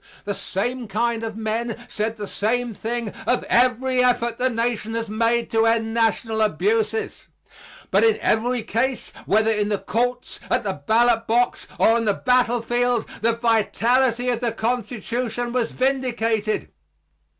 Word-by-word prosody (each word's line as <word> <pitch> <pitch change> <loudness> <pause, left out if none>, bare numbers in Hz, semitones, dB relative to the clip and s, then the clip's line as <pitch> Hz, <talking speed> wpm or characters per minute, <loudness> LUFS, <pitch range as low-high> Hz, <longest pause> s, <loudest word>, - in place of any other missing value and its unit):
The 205 - -2
same 235 +6 -3
kind 230 +3 -1
of 225 -1 -5
men 225 +1 -2
said 220 0 -3
the 210 - -5
same 235 +4 -1
thing 230 +1 -3 0.2
of 245 - +2
every 255 +1 +2
effort 240 -1 +1
the 255 +1 +2
Nation 230 -2 -2
has 230 -2 -3
made 230 +2 +1
to 225 0 +3
end 225 -1 +1
national 225 -1 +1
abuses. 215 +3 0 0.6
But 195 +3 +4
in 225 -1 +4
every 240 +2 0
case, 245 +4 -2
whether 220 +1 +3
in 210 -1 0
the 205 - +1
courts, 245 +4 -2
at 250 -1 +1
the 195 -2 -1
ballot 230 0 +3
box, 240 +2 +1
or - - +4
on 230 0 +2
the 205 -2 +2
battlefield, 245 -1 +1
the 230 +1 +2
vitality 235 +2 +2
of 240 -2 0
the 235 -2 -1
Constitution 240 +1 -3
was 245 -2 0
vindicated. 235 -5 -1
230 Hz, 150 wpm, -22 LUFS, 220-245 Hz, 0.6 s, But